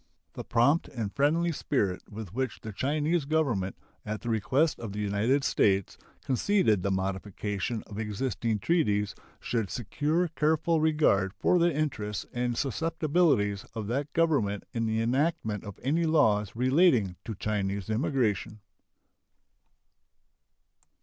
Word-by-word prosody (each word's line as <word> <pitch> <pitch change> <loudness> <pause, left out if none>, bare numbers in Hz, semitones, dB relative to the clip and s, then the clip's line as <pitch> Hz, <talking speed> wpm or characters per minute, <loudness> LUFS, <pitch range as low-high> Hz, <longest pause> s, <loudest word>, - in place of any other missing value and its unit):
The - - -6
prompt 140 +8 +2
and 110 -5 -5
friendly 165 +5 +2
spirit 100 - -1
with 105 -3 -8
which 130 +2 -3
the 110 - -6
Chinese 150 - 0
Government, 135 -12 0 0.3
at 105 0 -4
the 120 - -4
request 130 +8 +1
of 110 -4 -6
the 105 - -4
United 105 +7 +1
States, 95 -7 +2 0.3
conceded 135 - +2
the 100 - -1
modification 100 +3 -2
of 105 0 -8
existing 110 +1 -1
treaties 105 - +1 0.3
should 115 -5 -2
secure 145 - 0
careful 160 +1 +1
regard 150 -12 +2
for 180 - +2
the 170 0 +3
interests 110 -9 -2
and 120 -1 -1
susceptibilities 150 - +1
of 110 -2 -3
that 140 +4 -2
Government 140 -12 +1
in 115 -1 -1
the 110 0 0
enactment 120 - 0
of 100 -3 -9
any 160 +6 +1
laws 110 -11 +2
relating 125 - +3
to 110 - -5
Chinese 100 -1 -2
immigration. 110 - 0
120 Hz, 130 wpm, -28 LUFS, 105-150 Hz, 0.3 s, the